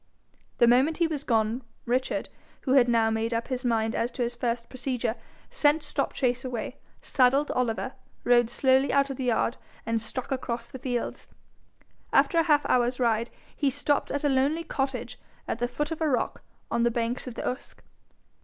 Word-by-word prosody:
The 235 - +6
moment 260 +7 +4
he 340 - +3
was 305 -3 -2
gone, 225 +1 +1 0.2
Richard, 255 +2 -1 0.3
who 260 - -2
had 260 -3 +6
now 225 -1 +3
made 225 +1 -1
up 230 +3 -2
his 255 -1 -2
mind 225 -2 +1
as 235 - 0
to 250 - -1
his 240 0 -2
first 235 -1 -2
procedure, 250 -3 -2 0.4
sent 305 -9 +3
Stopchase 250 -1 -1
away, 245 -4 -4 0.3
saddled 270 +3 +3
Oliver, 250 +1 -1 0.3
rode 240 -1 +4
slowly 265 +2 +3
out 275 0 +3
of 265 - -6
the 260 - -3
yard, 240 0 +1 0.3
and 230 0 0
struck 255 +4 -5
across 235 -3 -3
the 260 - -9
fields. 245 -2 -3 0.8
After 335 - +4
a - - +4
half 295 -1 +4
hour's 245 0 +2
ride 230 -1 +1 0.3
he 285 - +1
stopped 285 +2 0
at 285 - -2
a - - +3
lonely 280 +5 +2
cottage 265 -5 -3 0.3
at 225 - -2
the 245 - +1
foot 295 +6 -3
of 325 - -4
a 315 - +2
rock 255 - -1 0.3
on 235 - +1
the 235 - +4
banks 235 +2 -2
of 245 - -6
the - - -4
Usk. 250 - -5
250 Hz, 185 wpm, -27 LUFS, 235-270 Hz, 0.8 s, The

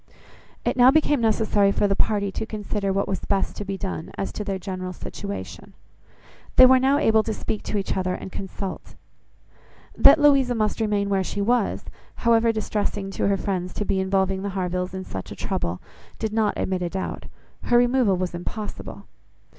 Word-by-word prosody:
It - - +1
now 250 +1 +8
became 295 -2 +3
necessary 215 -2 +2
for 205 - +1
the 195 - +1
party 200 -1 0
to 220 - -4
consider 205 -2 -3
what 195 +1 0
was 190 - -2
best 195 -1 -1
to - - -4
be 195 -1 -4
done, 190 -4 -5
as 195 - -3
to 210 - -5
their 195 -2 -2
general 185 -1 -5
situation. 200 +3 -7 0.8
They 255 - +9
were 260 0 +6
now 270 +2 +3
able 220 -4 +4
to 220 0 -3
speak 215 - -4
to 210 - -2
each 195 - -2
other 185 -1 -1
and 190 - -8
consult. 195 0 -6 1.0
That 280 +3 +8
Louisa 275 -4 +4
must 215 0 -1
remain 205 -2 0
where 195 -1 +1
she 205 - -5
was, 230 +1 +1 0.3
however 230 -1 +3
distressing 205 -2 -2
to - - -1
her 200 0 +2
friends 185 -2 -3
to 210 - -2
be 190 - 0
involving 190 0 0
the 200 - -3
Harvilles 180 0 -2
in 190 - -4
such 95 -1 -7
trouble, 85 +1 -2 0.4
did 220 -1 -3
not 215 -2 +1
admit 185 -1 -1
a 175 - -1
doubt. 190 +1 -4 0.4
Her 240 - +4
removal 245 -5 +3
was 180 -1 -2
impossible. 205 +5 -6
200 Hz, 185 wpm, -24 LUFS, 190-220 Hz, 1.0 s, They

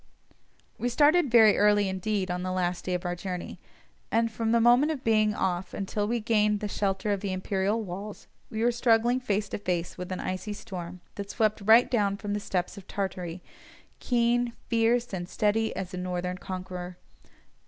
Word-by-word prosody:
We 245 - 0
started 295 +5 +4
very 225 -3 +6
early 205 -1 +4
indeed 190 0 -1
on 180 0 -2
the 185 0 -3
last 180 -1 -1
day 180 - 0
of 180 - -4
our 175 0 -1
journey, 180 0 -6 0.5
and 230 0 +2
from 225 0 -1
the 235 - +4
moment 245 +6 +5
of 280 -4 -5
being 215 -2 +3
off 180 -1 -2
until 205 +1 -2
we 235 +2 0
gained 210 -2 +2
the 210 - -3
shelter 200 0 -1
of 200 - -2
the 200 -1 -3
imperial 195 +3 -1
walls 200 +2 -7 0.2
we 220 +1 -2
were 240 - +4
struggling 235 +1 +3
face 210 -4 -1
to - - -4
face 180 -3 -3
with 180 0 -6
an 185 - -3
icy 185 +3 -4
storm 180 -3 -8
that 200 0 -6
swept 215 -1 0
right 225 +4 +7
down 200 -5 +1
from 205 -1 -4
the 205 - -1
steppes 185 -1 -3
of 195 - -17
Tartary, 180 -3 -4 0.6
keen, 240 0 +1 0.2
fierce, 230 0 +2
and 175 -1 -4
steady 220 +2 +1
as 185 -1 -5
a - - -4
northern 180 0 -3
conqueror. 180 -1 -6
205 Hz, 185 wpm, -28 LUFS, 185-225 Hz, 0.6 s, right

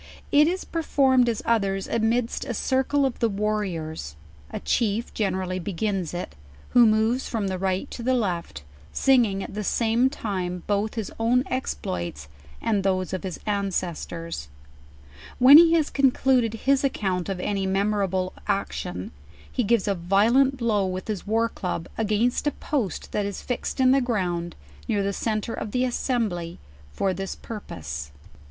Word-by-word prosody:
It 295 +1 +6
is 370 +2 -2
performed, 265 -6 +2
as 225 - -2
others, 195 -4 +1
amidst 230 +1 0
a 240 - -3
circle 265 +4 +1
of 265 - -2
the 230 - +2
warriors; 190 - -3 0.3
a - - -5
chief 225 0 0
generally 185 -3 -1
begins 190 -1 -2
it, 175 - -5 0.4
who 240 -2 +6
moves 220 +4 +2
from 215 -4 -1
the 185 -1 -3
ri.(U 190 +4 0
to - - -6
the 255 +2 +2
left, 175 - -2 0.3
singing 235 -8 +3
at - - -8
the 210 +1 -3
same 230 +5 +2
time 185 -8 -4
both 205 +2 0
his 220 -3 -4
own 240 +3 +3
exploits, 85 - -3 0.4
and 210 -3 +1
those 185 -1 0
of 185 - -2
his 185 -3 -5
aricdfctors. 175 - -3 0.9
W 250 - +2
r - - +8
hen 285 - +13
he 335 -1 +6
has 320 -3 +2
con 275 -1 +4
cluded 250 -3 +2
his 275 0 +3
accourt 190 -9 -1
of 190 -2 -3
any 195 0 -1
memorable 195 -1 0
action, 195 - -2 0.4
he 250 - 0
gives 225 -1 +2
a 200 - +3
vio 195 +5 +2
lent 270 +1 +4
blow 225 -5 +1
with 185 0 -4
his 210 -2 -4
war 225 +2 +2
club, 180 -6 -4
against 225 +5 +1
a - - +3
post 240 - -3
that 205 -1 -1
is 200 - -6
fixed 250 +2 -3
in 255 -1 +5
the 270 +1 +4
ground, 180 -8 -1 0.3
near 205 -2 +1
the 200 0 -1
centre 215 +2 -2
of 210 - -4
the 250 +4 +1
assembly 220 -9 -1 0.3
for 190 - 0
this 195 +1 -4
pur 225 -2 -7
pose. 75 - -7
210 Hz, 170 wpm, -25 LUFS, 185-245 Hz, 0.9 s, hen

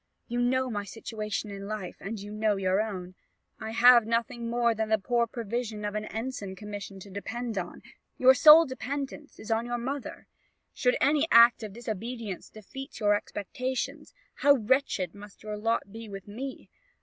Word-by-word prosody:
You 240 +1 -1
know 260 +1 +1
my 205 -2 -2
situation 215 0 -5
in 200 0 -7
life, 210 -4 -5
and 215 +2 -5
you 205 +1 -8
know 215 0 +1
your 190 +1 +1
own: 185 -4 -5 0.5
I 220 - -5
have 240 0 +6
nothing 230 +1 -1
more 235 0 +2
than 220 0 -2
the 220 - +4
poor 235 +3 +1
provision 225 -1 -4
of 205 - -2
an 215 0 -3
ensign's 220 -4 -5
commission 205 -1 -7
to 200 - -11
depend 225 +4 -4
on; 185 -3 -5 0.3
your 260 +1 +7
sole 310 +5 +9
dependence 280 +2 -5
is 220 - -7
on 225 +1 +1
your 240 0 -2
mother; 265 +3 -5 0.5
should - - +2
any 295 +2 +3
act 235 0 +7
of 215 -3 -6
disobedience 225 -2 -5
defeat 270 +6 -9
your 205 -2 +3
expectations, 255 - -4 0.2
how 285 - +6
wretched 220 -7 0
must 205 0 -13
your 215 0 -4
lot 210 -1 -1
be 225 0 -9
with 195 0 -8
me! 260 +6 -7
225 Hz, 175 wpm, -28 LUFS, 205-245 Hz, 0.5 s, sole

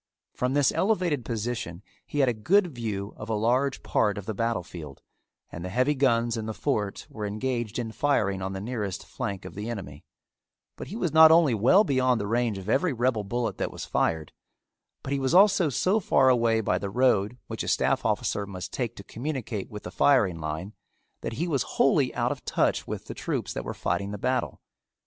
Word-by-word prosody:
From 125 +2 -1
this 145 -2 +4
elevated 180 - +1
position 115 -6 -4 0.2
he 145 - 0
had 135 - +4
a 125 - +2
good 175 - +2
view 105 -4 -4
of 105 - -8
a 110 - +1
large 125 +5 +1
part 105 -2 +1
of 100 - -6
the 110 - -3
battle 115 -2 -1
field 75 -6 -10 0.5
and 85 - -7
the 90 - -4
heavy 130 +9 +2
guns 120 -4 +2
in 110 -1 -4
the 110 - -4
fort 105 -8 -2
were 105 -2 -5
engaged 120 +1 -2
in 115 -2 -3
firing 105 -8 +1
on 95 +1 -3
the 95 - -4
nearest 105 -4 -4
flank 100 -1 -5
of - - -8
the 105 +3 -5
enemy; 80 -11 -7 0.7
but - - -8
he 205 - -7
was 175 -9 -1
not 160 0 +9
only 160 -5 +5
well 125 - +5
beyond 130 - +2
the 105 - -2
range 115 -1 0
of 95 0 -8
every 145 +10 +2
rebel 120 -3 0
bullet 115 -1 -2
that - - -1
was - - -7
fired, 80 -2 0 0.7
but 135 - -3
he 140 - 0
was 135 +5 +1
also 190 -4 +6
so 185 - +2
far 135 -8 +4
away 115 -3 +3
by 90 -3 0
the 100 - -4
road 115 -1 +2
which - - -5
a - - -4
staff - - +1
officer 100 -1 -1
must 90 -2 -7
take 120 -4 -2
to 100 - -10
communicate 120 -4 -4
with 105 -1 -8
the - - -7
firing 105 -12 +3
line, 80 +6 -5 0.5
that - - -4
he 165 +9 -2
was 140 -6 0 0.2
wholly - - +3
out - - +1
of - - -5
touch - - 0
with - - -5
the - - -6
troops - - -3
that - - -4
were - - -4
fighting 100 0 -2
the 105 - -5
battle. 125 +3 -1
115 Hz, 210 wpm, -27 LUFS, 100-135 Hz, 0.7 s, not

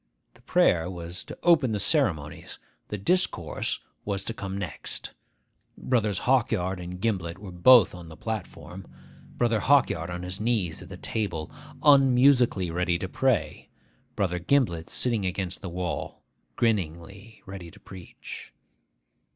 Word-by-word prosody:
The - - -22
prayer 85 +1 +2
was 85 +1 -6
to - - -9
open 155 -9 +4
the 105 - -1
ceremonies; 90 - 0 0.3
the 105 - -4
discourse 100 - 0 0.2
was 100 -1 -2
to 115 - -4
come 100 -3 -5
next. 95 -6 -5 0.6
Brothers 110 -6 0
Hawkyard 110 -8 +1
and 90 +1 -7
Gimblet 95 -5 -1
were 100 -1 -9
both 100 +4 +6
on 85 -2 -10
the 80 - -12
platform; 90 -4 -6 0.5
Brother 115 -2 +2
Hawkyard 100 - +2
on 90 0 -5
his 90 +3 -5
knees 110 -7 0
at - - -11
the - - -8
table, 90 -8 -3 0.3
unmusically 130 - +5
ready 90 0 0
to 95 - -4
pray; 130 +2 0 0.5
Brother 90 -4 0
Gimblet 85 -6 +1
sitting 115 -5 0
against 95 0 -3
the 95 - -5
wall, 90 0 -4 0.3
grinningly 100 0 -2
ready 95 -4 -8
to - - -17
preach. 95 -2 -11
95 Hz, 135 wpm, -27 LUFS, 90-115 Hz, 0.6 s, both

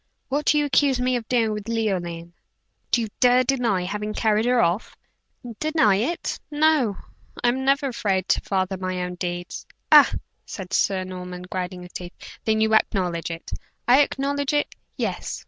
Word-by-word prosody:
What 285 +2 -1
do 300 - +4
you 295 - +2
accuse 280 -2 +2
me 250 0 +1
of 235 -3 -4
doing 230 -3 +2
with 210 +1 -5
Leoline?" 175 -7 -2 0.6
"Do 240 - +2
you 225 - -2
dare 250 0 +5
deny 240 -8 +1
having 210 +3 -4
carried 220 0 +2
her 250 0 +3
off?" 175 +4 0 0.6
"Deny 310 -11 +3
it? 275 - -2
No; 295 -8 +2 0.5
I 240 - +5
am 260 +2 -1
never 275 +1 +2
afraid 195 -6 -1
to - - +3
father 190 -1 -1
my 185 0 -3
own 180 0 -4
deeds." 175 0 -5 0.2
"Ah!" - - +8 0.3
said 190 -3 -8
Sir 190 -2 +1
Norman 180 -1 -7
grinding 180 0 -5
his 180 - -13
teeth. 175 0 -7 0.3
"Then 220 0 +2
you 220 0 +2
acknowledge 180 -6 +1
it?" 165 0 -7 0.4
"I 255 +4 +7
acknowledge 280 0 -1
it 295 - 0 0.2
yes. - - -3
215 Hz, 170 wpm, -23 LUFS, 185-255 Hz, 0.6 s, Ah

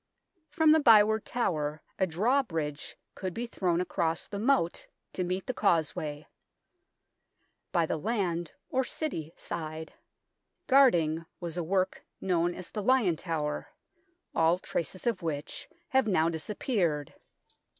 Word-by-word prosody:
From 315 +1 +4
the 315 - +6
Byward 220 -5 +6
Tower 155 -10 -1 0.2
a 190 - +3
drawbridge 165 - -1 0.2
could 185 -2 -5
be 235 - -2
thrown 180 -7 0
across 165 -2 -1
the 200 - -5
moat 230 -7 +1 0.3
to 185 - -1
meet 185 +2 -2
the 255 - -2
causeway. 155 -7 0 1.5
By 170 -2 +3
the 160 - -1
land 175 -5 -1 0.2
(or 260 0 +2
City) 170 - -3
side, 160 -1 -6 0.7
guarding, 170 - +4
was 170 -2 -5
a 175 - -1
work 185 +2 0 0.2
known 175 -2 +1
as 185 - -8
the 210 - -3
Lion 220 -6 +3
Tower, 155 -3 -3 0.7
all 165 +2 +3
traces 180 0 -4
of 230 -6 0
which 155 -3 -4 0.2
have 265 -3 +3
now 165 -5 +3
dis 160 +2 -5
appeared. 175 - -1
175 Hz, 130 wpm, -29 LUFS, 160-220 Hz, 1.5 s, the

